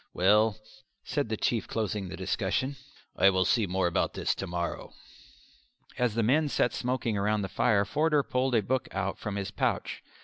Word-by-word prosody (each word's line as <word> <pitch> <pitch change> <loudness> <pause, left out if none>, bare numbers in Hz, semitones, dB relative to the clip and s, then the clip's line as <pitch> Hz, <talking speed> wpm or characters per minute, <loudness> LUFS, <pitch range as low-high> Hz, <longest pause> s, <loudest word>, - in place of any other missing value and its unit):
"Well," 105 +4 +4 0.5
said 145 -6 -2
the 110 - -1
Chief, 115 +1 0
closing 105 -3 -2
the 95 - -7
discussion, 100 +8 -1 0.4
"I 95 - +6
will 95 -1 +2
see 100 +7 +2
more 95 +1 0
about 85 - 0
this - - 0
to 95 - -5
morrow." 85 0 -4 1.0
As 125 -3 0
the 115 - +1
men 145 +7 +3
sat 120 - +1
smoking 125 -4 -1
round 105 +1 +1
the - - -2
fire 100 -1 +2
Forder 150 +4 +2
pulled 125 -1 0
a 110 - +3
book 130 +5 -1
out 100 0 -2
from 105 -2 -4
his 100 -1 -3
pouch. - - -2
105 Hz, 180 wpm, -29 LUFS, 95-125 Hz, 1.0 s, I